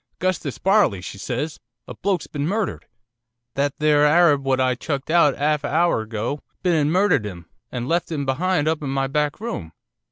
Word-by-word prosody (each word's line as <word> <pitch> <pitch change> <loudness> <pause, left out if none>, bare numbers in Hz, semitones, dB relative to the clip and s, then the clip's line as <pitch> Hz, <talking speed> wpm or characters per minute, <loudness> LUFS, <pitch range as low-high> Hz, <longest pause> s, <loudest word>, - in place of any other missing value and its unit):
"'Gustus 175 -7 -2
Barley," 195 - +3
she 95 +2 -8
says, 130 +8 -3 0.3
"a - - -7
bloke's 195 -2 -1
been 145 0 -3
murdered. 210 +2 -2 0.7
That 140 0 -1
there 150 -1 +4
Harab 155 -4 +4
what 135 -1 +1
I 130 -1 +2
chucked 140 +3 -4
out 165 -4 +4
'alf 150 +1 0
a - - -1
hour 165 -5 +2
ago 110 +6 -3 0.2
been 180 - +2
and 150 -2 +2
murdered 185 - +3
'im, 90 -5 -7 0.3
and 125 -1 -4
left 170 +2 0
'im 145 -3 -2
behind 155 +3 0
up 160 -1 0
in 140 - -3
my 135 0 0
back 145 +2 -1
room. 145 - -5
145 Hz, 190 wpm, -22 LUFS, 135-170 Hz, 0.7 s, there